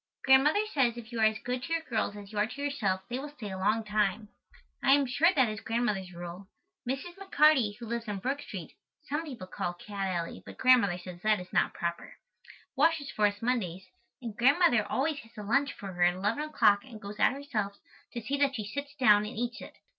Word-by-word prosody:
Grandmother 285 Hz, +10 st, +5 dB
says 245 Hz, -5 st, +2 dB
if 235 Hz, 0 st, -9 dB
you 235 Hz, -, -4 dB
are 220 Hz, -, +5 dB
as 215 Hz, 0 st, -1 dB
good 250 Hz, 0 st, -2 dB
to 330 Hz, -, -3 dB
your 330 Hz, -1 st, 0 dB
girls 220 Hz, -6 st, -1 dB
as 200 Hz, -1 st, -10 dB
you 210 Hz, -, -3 dB
are 210 Hz, -, +3 dB
to 275 Hz, -, -10 dB
yourself 210 Hz, -10 st, 0 dB
they 245 Hz, +1 st, -3 dB
will 295 Hz, +2 st, -6 dB
stay 240 Hz, -9 st, -8 dB
a 190 Hz, -, -5 dB
long 215 Hz, +4 st, +1 dB
time. 210 Hz, 0 st, 0 dB, 0.5 s
I 270 Hz, -, +6 dB
am 285 Hz, 0 st, +4 dB
sure 285 Hz, +6 st, +3 dB
that 265 Hz, -4 st, +4 dB
is 215 Hz, 0 st, -4 dB
Grandmother's 210 Hz, -6 st, -1 dB
rule. 175 Hz, +2 st, -8 dB, 0.4 s
Mrs. 345 Hz, +8 st, -4 dB
McCarty, 300 Hz, -, +3 dB
who 240 Hz, -, -8 dB
lives 235 Hz, 0 st, -4 dB
on 205 Hz, -1 st, -3 dB
Brook 270 Hz, +8 st, -2 dB
Street -, -, -8 dB, 0.3 s
(some 300 Hz, +2 st, -2 dB
people 250 Hz, -11 st, -7 dB
call 175 Hz, -1 st, -3 dB
it 175 Hz, -, -16 dB
Cat 200 Hz, -2 st, -3 dB
Alley 170 Hz, -3 st, -3 dB
but -, -, -11 dB
Grandmother 240 Hz, -8 st, +4 dB
says 180 Hz, -1 st, -10 dB
that 215 Hz, 0 st, +2 dB
is 180 Hz, 0 st, -11 dB
not -, -, +2 dB
proper), 170 Hz, 0 st, -4 dB, 0.6 s
washes 320 Hz, -3 st, +2 dB
for 210 Hz, -1 st, +3 dB
us 205 Hz, +1 st, -5 dB
Mondays, 190 Hz, -7 st, -1 dB, 0.4 s
and 225 Hz, -3 st, -5 dB
Grandmother 260 Hz, -1 st, +4 dB
always 290 Hz, +2 st, 0 dB
has 225 Hz, -2 st, -16 dB
a 210 Hz, -, -6 dB
lunch 275 Hz, +7 st, +2 dB
for 195 Hz, -2 st, -8 dB
her 175 Hz, -, -6 dB
at 175 Hz, 0 st, +5 dB
eleven 210 Hz, +10 st, -1 dB
o'clock 205 Hz, -9 st, +3 dB
and 220 Hz, -, -11 dB
goes 205 Hz, +1 st, -9 dB
out -, -, +4 dB
herself 245 Hz, -8 st, -3 dB, 0.4 s
to 235 Hz, -, -4 dB
see 280 Hz, +5 st, -2 dB
that 280 Hz, -1 st, +2 dB
she 215 Hz, -, -4 dB
sits 285 Hz, +6 st, -6 dB
down 210 Hz, -7 st, +5 dB
and 210 Hz, 0 st, -6 dB
eats 240 Hz, +1 st, -3 dB
it. -, -, -11 dB
225 Hz, 230 wpm, -30 LUFS, 205-275 Hz, 0.6 s, I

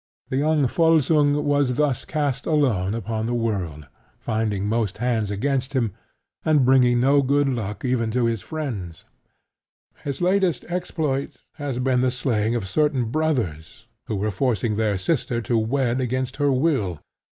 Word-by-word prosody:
The 130 Hz, -, -1 dB
young 150 Hz, 0 st, +2 dB
Volsung 150 Hz, -1 st, +3 dB
was 145 Hz, -3 st, +2 dB
thus 145 Hz, -3 st, 0 dB
cast 145 Hz, -4 st, -2 dB
alone 115 Hz, -, +1 dB
upon 110 Hz, -1 st, -3 dB
the 120 Hz, -, -1 dB
world, 95 Hz, -10 st, -2 dB, 0.3 s
finding 110 Hz, -3 st, -1 dB
most 110 Hz, -2 st, -1 dB
hands 115 Hz, -3 st, 0 dB
against 130 Hz, +5 st, -1 dB
him, 115 Hz, -7 st, 0 dB, 0.5 s
and 150 Hz, -4 st, +3 dB
bringing 125 Hz, -2 st, +4 dB
no 140 Hz, +3 st, +4 dB
good 140 Hz, +1 st, +2 dB
luck 110 Hz, -4 st, -3 dB
even 120 Hz, -3 st, 0 dB
to 120 Hz, +2 st, +1 dB
his 115 Hz, -3 st, 0 dB
friends. 105 Hz, -, -5 dB, 1.0 s
His 140 Hz, -2 st, -4 dB
latest 185 Hz, -1 st, +1 dB
exploit 160 Hz, -6 st, -2 dB, 0.2 s
has 145 Hz, -4 st, -3 dB
been 125 Hz, 0 st, +1 dB
the 130 Hz, -, +3 dB
slaying 120 Hz, -3 st, 0 dB
of 110 Hz, -5 st, -2 dB
certain 135 Hz, -2 st, +1 dB
brothers 120 Hz, -, -2 dB, 0.2 s
who 110 Hz, -, -2 dB
were 105 Hz, +2 st, -1 dB
forcing 110 Hz, 0 st, 0 dB
their 105 Hz, -2 st, +1 dB
sister 120 Hz, -, -1 dB
to 120 Hz, -, 0 dB
wed 125 Hz, +2 st, +1 dB
against 130 Hz, +1 st, -2 dB
her 145 Hz, -1 st, +2 dB
will. 130 Hz, -, 0 dB
125 Hz, 150 wpm, -23 LUFS, 110-145 Hz, 1.0 s, bringing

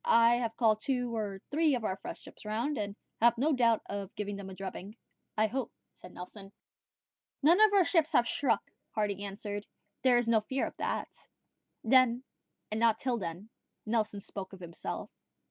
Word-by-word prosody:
I 230 Hz, +1 st, +5 dB
have 230 Hz, -2 st, -2 dB
called 220 Hz, -3 st, +3 dB
two 245 Hz, -1 st, -1 dB
or 205 Hz, -3 st, -3 dB
three 305 Hz, -1 st, +3 dB
of 240 Hz, -, -3 dB
our 190 Hz, -, 0 dB
fresh -, -, -8 dB
ships -, -, -13 dB
round, 230 Hz, +8 st, -1 dB
and 205 Hz, -1 st, -3 dB, 0.3 s
have 235 Hz, 0 st, +5 dB
no 295 Hz, +6 st, +2 dB
doubt 235 Hz, -4 st, +3 dB
of 200 Hz, -1 st, -5 dB
giving 205 Hz, -1 st, -3 dB
them 200 Hz, -1 st, -7 dB
a 190 Hz, -, -8 dB
drubbing." 195 Hz, +2 st, -7 dB, 0.4 s
"I 215 Hz, -, +4 dB
hope," 245 Hz, +2 st, -2 dB, 0.2 s
said -, -, -13 dB
Nelson, 195 Hz, +2 st, -9 dB, 0.9 s
"none 340 Hz, +7 st, +6 dB
of 435 Hz, -1 st, +7 dB
our 395 Hz, -3 st, +5 dB
ships 325 Hz, -2 st, +2 dB
have 245 Hz, -4 st, +5 dB
struck." 230 Hz, -6 st, 0 dB, 0.2 s
Hardy 205 Hz, -2 st, 0 dB
answered, 205 Hz, +1 st, -5 dB, 0.3 s
"There 255 Hz, -2 st, +5 dB
is 240 Hz, -1 st, +1 dB
no 230 Hz, -1 st, +5 dB
fear 260 Hz, +5 st, -1 dB
of -, -, -7 dB
that." -, -, -2 dB, 0.7 s
Then, 250 Hz, +1 st, +4 dB, 0.5 s
and 215 Hz, -, -1 dB
not 230 Hz, -1 st, +4 dB
till 250 Hz, -3 st, -1 dB
then, 180 Hz, +3 st, -6 dB, 0.4 s
Nelson 215 Hz, -2 st, 0 dB
spoke 195 Hz, -1 st, -7 dB
of 190 Hz, -, -10 dB
himself. 170 Hz, -2 st, -6 dB
225 Hz, 180 wpm, -31 LUFS, 200-250 Hz, 0.9 s, of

